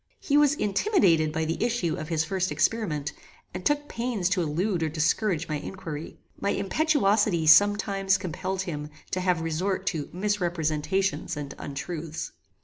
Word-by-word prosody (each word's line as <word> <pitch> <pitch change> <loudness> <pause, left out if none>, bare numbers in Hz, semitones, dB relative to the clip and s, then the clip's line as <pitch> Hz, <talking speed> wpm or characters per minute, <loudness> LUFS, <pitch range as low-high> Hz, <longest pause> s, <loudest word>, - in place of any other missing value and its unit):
He 285 - 0
was 295 -1 +5
intimidated 195 - +2
by 160 +1 -1
the 165 +6 -1
issue 230 -9 0
of 155 -3 -6
his 160 -2 +1
first 185 +2 -1
experiment, 150 -11 0 0.4
and 180 0 -5
took 290 0 +1
pains 230 -6 -1
to 180 -1 +1
elude 170 +4 0
or 160 - +1
discourage 165 +2 0
my 155 - -2
inquiry. 160 -2 -7 0.2
My 200 - 0
impetuosity 205 - +2
some 205 +7 +7
times 195 -1 +1
compelled 185 +1 -3
him 150 -5 -5 0.2
to 185 - 0
have 180 -2 +1
resort 185 +4 -1
to 150 -3 -4
misrepresentations 180 -2 -1
and 145 -1 -5
untruths. 155 +3 -5
180 Hz, 150 wpm, -27 LUFS, 160-205 Hz, 0.4 s, some